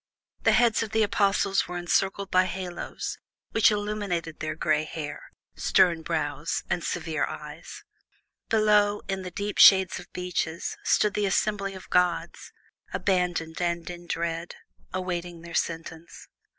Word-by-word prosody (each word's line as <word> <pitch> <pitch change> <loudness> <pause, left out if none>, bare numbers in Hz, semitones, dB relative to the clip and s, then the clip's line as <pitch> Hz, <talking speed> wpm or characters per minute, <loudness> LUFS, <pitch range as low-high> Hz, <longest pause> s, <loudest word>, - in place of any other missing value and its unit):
The - - +4
heads 235 -2 +4
of 220 -1 -4
the 220 0 +4
Apostles 200 -1 +2
were 180 0 -5
encircled 195 +3 0
by 185 0 +5
halos, 185 -2 -5 0.3
which 225 - +5
illuminated 205 -6 -2
their 155 - -3
gray 155 -1 +1
hair, 150 -1 -6 0.3
stern 170 -3 +3
brows, 150 -2 -2
and 175 - 0
severe 160 -3 -1
eyes. 150 +2 -9 0.7
Below, 210 -2 +3
in 195 -1 -2
the 185 - -6
deep 200 +3 -4
shade 190 -3 +7
of 175 - -13
beeches, 180 -2 -3
stood 210 -1 +3
the 205 -1 +1
assembly 195 0 0
of 190 - -10
gods, 180 -1 0 0.4
abandoned 180 -4 0
and 170 -1 -1
in 175 0 -10
dread, 170 0 -3 0.4
awaiting 175 -2 -4
their 170 0 -9
sentence. 165 0 -4
180 Hz, 135 wpm, -27 LUFS, 165-200 Hz, 0.7 s, shade